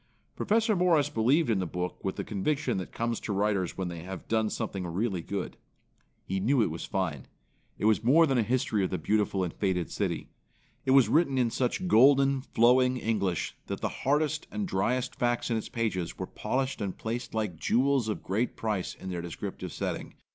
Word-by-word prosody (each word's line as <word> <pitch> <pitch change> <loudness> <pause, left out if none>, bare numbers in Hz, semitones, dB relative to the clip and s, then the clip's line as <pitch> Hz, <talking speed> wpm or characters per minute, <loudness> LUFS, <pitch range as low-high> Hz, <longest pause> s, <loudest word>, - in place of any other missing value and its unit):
Professor 220 0 +2
Morris 175 -6 +3
believed 125 +5 +2
in 105 - +2
the 90 - -1
book 90 +2 -4
with 95 - -2
the - - -3
conviction 140 +9 -1
that 90 - -6
comes 115 0 -2
to - - -5
writers 100 -3 0
when 95 -1 -2
they 85 -2 -6
have 95 0 -8
done 110 -1 +1
something 95 -3 -3
really 95 +1 -1
good. 100 +2 -4 0.7
He 95 +1 -2
knew 125 +8 +2
it 85 - -1
was 80 - -5
fine. 85 -9 -2 0.5
It - - -2
was 110 0 +3
more 150 +8 +6
than 135 -5 +1
a - - +5
history 110 -3 +1
of 95 - 0
the 90 - -2
beautiful 100 +2 +1
and 85 - -3
fated 90 -6 -1
city. - - -2 0.6
It - - +4
was 135 - +6
written 150 -4 +3
in 120 -3 +2
such 130 +10 -1
golden, 135 0 +5
flowing 125 +1 +3
English 100 -7 -1
that - - -4
the - - 0
hardest 150 +2 0
and 210 -2 -3
driest 125 - 0
facts 120 0 0
in 115 - +2
its 110 - -5
pages 105 -7 -2
were - - -3
polished 130 -2 -2
and 100 -2 -3
placed 115 +1 -4
like 105 -7 -2
jewels 130 +2 +2
of 105 - -3
great 110 +6 -1
price 105 -5 -2
in 95 - -7
their 90 -1 -3
descriptive 85 -1 -6
setting. - - -4
110 Hz, 200 wpm, -29 LUFS, 95-130 Hz, 0.7 s, more